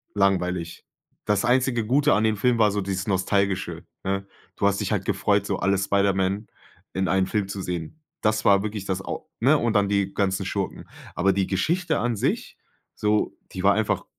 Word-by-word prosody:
langweilig." 90 -4 0 0.4
Das 105 +1 +1
einzige 120 -2 +2
Gute 145 +4 +3
an 110 - +2
dem 110 -1 +2
Film 120 +2 +2
war 105 -2 +5
so 105 - -1
dieses 95 0 -3
Nostalgische, 100 0 0 0.2
ne? 95 0 -1 0.3
Du - - +1
hast 100 0 +2
dich - - -2
halt - - 0
gefreut, - - +1
so - - -1
alle 95 +2 +1
Spiderman 100 +1 +1 0.5
in 95 -1 0
einen 95 0 +2
Film 100 -1 -1
zu 100 -1 -5
sehen. 90 - -5 0.2
Das 110 0 +1
war 100 0 +5
wirklich 105 -2 -4
das 95 0 -2
au - - -6
ne 140 +6 +5
und 115 -3 0
dann 100 -1 +3
die 100 -1 0
ganzen 95 -1 0
Schurken. 95 0 -3 0.3
Aber 95 +3 +2
die 95 0 0
Geschichte 160 - 0
an 120 -1 0
sich, - - -2 0.4
so, 105 0 0 0.2
die 95 - -5
war 100 0 +6
einfach 110 0 0
100 Hz, 190 wpm, -24 LUFS, 95-110 Hz, 0.5 s, war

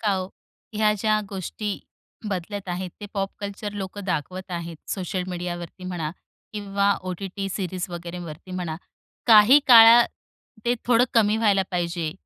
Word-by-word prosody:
का 210 -3 +1
हो, 185 -1 -2 0.5
ह्या 210 0 +3
ज्या 215 0 +2
गोष्टी 200 +2 -4 0.5
बदलत 195 +1 -4
आहेत, 180 +1 -3
ते 205 - -6
पॉप 195 -1 -1
कल्चर 205 +1 -5
लोकं 200 0 -6
दाखवत 185 +2 -3
आहेत. 170 -1 -5
सोशल 185 -1 -2
मीडियावरती 175 0 -6
म्हणा 170 -4 -3 0.4
किंवा 200 -1 +1
ओ-टी-टी 190 +2 -4
सीरीज 185 -2 -3
वगैरेवरती 175 -1 -8
म्हणा, 180 -3 -4 0.5
काही 225 +4 +8
काळात 235 -1 +9 0.6
ते 240 +1 +2
थोडं 245 0 +5
कमी 215 -2 +4
व्हायला 205 -4 +3
पाहिजे? 170 -3 -2
190 Hz, 135 wpm, -24 LUFS, 180-210 Hz, 0.6 s, काळात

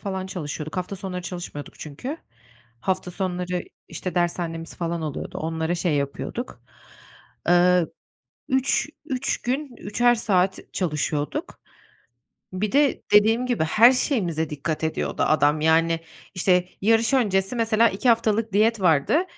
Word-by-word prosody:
falan 190 -1 -4
çalışıyorduk. 155 -3 -5
Hafta 185 +2 -3
sonları 185 -1 -5
çalışmıyorduk 175 -5 -7
çünkü. 160 - -6 0.6
Hafta 185 +3 -1
sonları, 180 -1 -2 0.3
işte, 185 -3 -5
dershanemiz 170 -1 -2
falan 170 -1 -3
oluyordu, 150 -3 -5
onlara 160 +1 -2
şey 170 -2 0
yapıyorduk. 140 - -4 0.9
Eee, 175 0 +5 0.6
3 265 +3 +1 0.2
3 260 -3 -2
gün, 260 +1 -3
3'er 240 +3 +2
saat 190 -4 +1
çalışıyorduk. 150 -4 -2 0.9
Bir 195 +2 -2
de 285 -1 +3
dediğim 225 +4 +5
gibi 245 -10 +1
her 225 +10 +6
şeyimize 180 - 0
dikkat 155 +2 -3
ediyordu 160 - -2
adam, 150 0 +3
yani. 165 +1 +3 0.3
İşte, 180 0 +2
yarış 225 +4 +3
öncesi 200 -3 +1
mesela 230 0 +3
2 205 +7 -1
haftalık 225 -2 +2
diyet 215 +2 +3
vardı, 175 - +3
185 Hz, 125 wpm, -24 LUFS, 165-225 Hz, 0.9 s, her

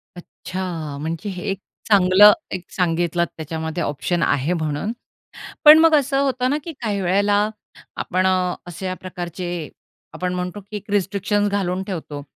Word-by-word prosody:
अच्छा! 175 -4 -6
म्हणजे 165 +6 -4
हे 180 -2 -6
एक 195 - -4 0.3
चांगलं 200 +1 +7 0.2
एक 185 -2 -5
सांगितलत 170 -1 0
त्याच्यामध्ये 160 +1 -4
ऑप्शन 165 +4 -1
आहे 145 +6 +1
म्हणून. 155 +4 -2 0.7
पण 305 +1 +11
मग 325 0 +5
असं 275 -2 +2
होतं 255 -2 0
ना, 290 - +1
की 335 - -5
काही 210 -4 -1
वेळेला 200 +3 +2 0.6
आपण 185 +1 0
अ, 185 -1 +1
अश्या 185 +2 -5
प्रकारचे 175 -2 -5 0.5
आपण 180 0 -2
म्हणतो 180 +2 -4
की 200 +2 -9
एक 205 0 -9
रिस्ट्रिक्शन्स 205 +1 +1
घालून 190 -2 -1
ठेवतो. 155 -7 -6
185 Hz, 145 wpm, -21 LUFS, 170-205 Hz, 0.7 s, पण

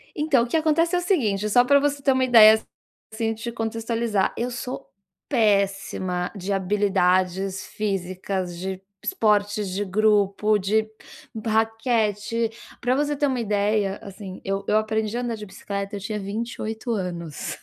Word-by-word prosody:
Então, 295 -5 +2
o - - -3
que 240 - -2
acontece 325 +2 +2
é - - +3
o - - -4
seguinte 215 - +1
só 245 +4 +5
pra 280 +2 +5
você 285 0 0
ter 275 - +3
uma 260 0 +2
ideia, 220 -3 +8 0.5
assim, 225 0 -1
te 225 +2 -6
contextualizar. 225 -2 -1
Eu 245 +2 -2
sou 245 -2 -6 0.4
péssima 195 -5 0
de 195 +1 -3
habilidades 190 -1 +1
físicas, 185 -2 -3
de 190 +1 -4 0.2
esportes 210 - +1
de 195 +3 -2
grupo, 210 +1 +2
de 215 +3 +1 0.6
raquete. 225 0 0 0.3
Pra 245 +1 +1
você 295 +1 0
ter 290 - +2
uma 260 -2 -1
ideia, 205 -2 0
assim, 195 -1 -9
eu 195 0 -1
eu 215 - +3
aprendi 220 +1 -1
a - - -1
andar 240 -2 -2
de 210 -1 -8
bicicleta 200 +1 -5
eu - - -4
tinha 210 +2 -4
28 220 +2 -4
anos, 175 - -4
215 Hz, 155 wpm, -24 LUFS, 195-235 Hz, 0.6 s, ideia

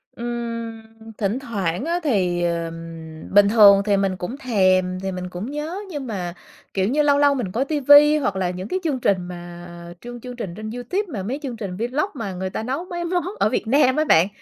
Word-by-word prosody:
Ừm, 230 -1 -4 0.4
thỉnh 210 +3 -1
thoảng 200 - -2
á 345 +2 0
thì 180 - +1
ừm, 165 -1 -5
bình 200 0 +6
thường 205 -3 +7
thì 205 -2 +3
mình 195 -1 0
cũng 205 +9 -5
thèm 185 -7 +2
thì 190 0 -3
mình 180 0 -5
cũng 185 +9 -6
nhớ 310 +6 -4
nhưng 290 -6 -5
mà, 180 -6 -4 0.4
kiểu 190 -1 +1
như, 295 +5 +2
lâu 290 -1 +4
lâu 285 0 +5
mình 230 -9 -3
coi 240 +7 0
ti 295 0 -1
vi 290 +2 +7
hoặc 265 -10 -1
là 185 -2 0
những 180 +2 -5
cái 370 - -1
chương 290 -6 -1
trình 200 -5 +2
mà 175 0 -9 0.3
chương 240 0 -8
chương 250 0 -8
trình 200 -8 -5
trên 215 +2 -6
YouTube 245 - -2
mà 200 -5 -3
mấy 255 +9 -3
chương 255 -4 -4
trình 195 -4 -5
vlog 255 - -1
mà 225 -9 -5
người 185 +1 -3
ta 220 - -4
nấu 270 +9 -3
mấy 345 -1 -4
món 355 +1 0 0.2
ở - - +3
Việt 220 - -2
Nam 260 +1 +4
á 310 - +2
bạn, 170 - +5
220 Hz, 225 wpm, -22 LUFS, 185-275 Hz, 0.4 s, thường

